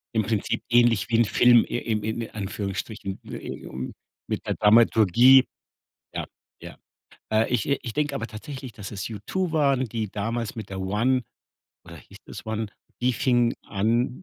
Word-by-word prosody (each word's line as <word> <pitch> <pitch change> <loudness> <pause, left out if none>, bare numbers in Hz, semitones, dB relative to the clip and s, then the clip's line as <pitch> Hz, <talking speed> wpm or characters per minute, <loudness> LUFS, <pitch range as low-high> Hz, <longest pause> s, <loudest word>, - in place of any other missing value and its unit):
Im 110 - +3
Prinzip 105 0 -1
ähnlich 120 -6 +4
wie 115 - +3
'n 120 - +5
Film 120 +2 +5
in 110 -3 -2
im - - -11 0.2
in 115 - -5
Anführungsstrichen 100 0 -5
wie - - -7
um 65 0 -6 0.3
mit - - -3
der - - 0
Dramaturgie 115 +4 +6 0.7
Ja, - - -3 0.4
ja. - - -10 0.5
Äh, 110 +1 +3
ich 110 - +1
äh, 140 - +2
ich 115 - -6
denke 145 -1 -1
aber 115 -4 -3
tatsächlich, 130 +3 -8
dass 100 -3 -8
es 100 -2 -5
U2 160 - -3
waren, 140 -4 +2
die 110 -2 -4
damals 115 +2 -3
mit 110 -3 -7
der 95 -1 -5
One 115 +7 +1 0.6
oder 85 -1 -11
hieß 75 - -15
das - - -9
One? 110 0 -2 0.3
Die 125 +1 +2
fing 120 0 +2
an 115 - 0
115 Hz, 170 wpm, -25 LUFS, 105-125 Hz, 0.7 s, Dramaturgie